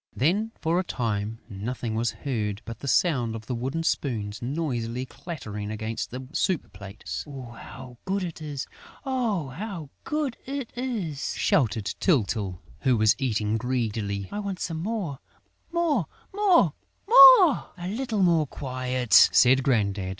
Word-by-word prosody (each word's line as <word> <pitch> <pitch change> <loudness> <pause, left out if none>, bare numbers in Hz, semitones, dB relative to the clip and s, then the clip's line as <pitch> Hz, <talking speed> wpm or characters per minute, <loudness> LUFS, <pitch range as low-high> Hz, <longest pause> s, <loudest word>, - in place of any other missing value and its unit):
Then, 200 - +1
for 165 +2 +1
a - - 0
time, 110 - -2
nothing 115 +2 -4
was 115 +1 0
heard 110 -3 -3
but 115 -1 -7
the 140 - -7
sound 125 -8 +2
of 110 -1 -8
the 125 - -3
wooden 130 +7 -2
spoons 110 -10 -2
noisily 125 -3 -2
clattering 120 - -7
against 110 +1 -4
the 130 +1 -7
soup 180 -2 -1
plates. 100 +1 -7
"How 125 -2 -10
good 195 0 -1
it 170 -3 -6
is! 145 -3 -4 0.4
Oh, 230 - -1
how 165 - -6
good 300 -5 -2
it 275 -3 -4
is!" 220 - -3
shouted 110 -5 +1
Tyltyl, 105 - +1 0.2
who 130 -3 +2
was 110 0 +4
eating 110 -4 0
greedily. 110 -5 -2
"I 205 - -3
want 200 -3 -4
some 165 -2 -3
more! 190 -9 -3 0.5
More! 315 - +1 0.3
More! 395 -4 +4 0.3
More!" 475 +1 +11
"Come, 355 - +3
come, 175 - -7
a - - -2
little 220 -2 -1
more 165 -4 +3
quiet," 130 -4 -3 0.2
said 130 +2 +5
Grandad. 100 -7 0
130 Hz, 150 wpm, -26 LUFS, 110-185 Hz, 0.5 s, More